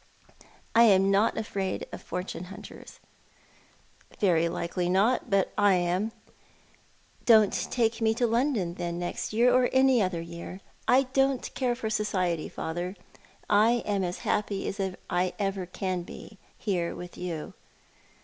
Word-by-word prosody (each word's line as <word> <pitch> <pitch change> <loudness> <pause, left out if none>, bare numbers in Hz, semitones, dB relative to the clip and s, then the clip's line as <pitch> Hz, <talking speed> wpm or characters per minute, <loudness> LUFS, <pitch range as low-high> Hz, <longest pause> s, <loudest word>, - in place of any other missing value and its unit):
" - - -16 0.3
I 235 +1 +8
am 195 -2 +5
not 200 +3 +3
afraid 195 -3 -3
of - - -7
fortune 180 -1 -5
hunters." 195 +2 -11 0.6
" - - -28
Very 170 -4 +3
likely 175 +1 -2
not; 205 +7 +2
but 195 -1 +1
I 205 -2 +5
am." 180 +5 0 0.6
" - - -33
Don't 220 -4 +6 0.2
take 230 -1 0
me 220 0 +2
to 240 - +1
London, 230 -6 +1
then, 175 -1 -4
next 175 0 -4
year, 240 +3 +4
or 255 0 +4
any 260 -2 +4
other 185 -3 0
year. 170 +2 -8 0.3
I 260 +2 +5
don't 270 -1 +1
care 250 -2 0
for 220 -3 -4
society, 185 -6 -1
father. 175 +4 -4 0.5
I 220 +3 +4
am 200 -2 0
as 180 0 -3
happy 205 -2 -1
as 200 - -3 0.3
I 180 +1 0
ever 195 -3 -2
can 185 0 -3
be, 195 +3 -11 0.2
here 180 -5 -1
with 175 0 -9
you." 170 -4 -5
195 Hz, 150 wpm, -28 LUFS, 180-225 Hz, 0.6 s, I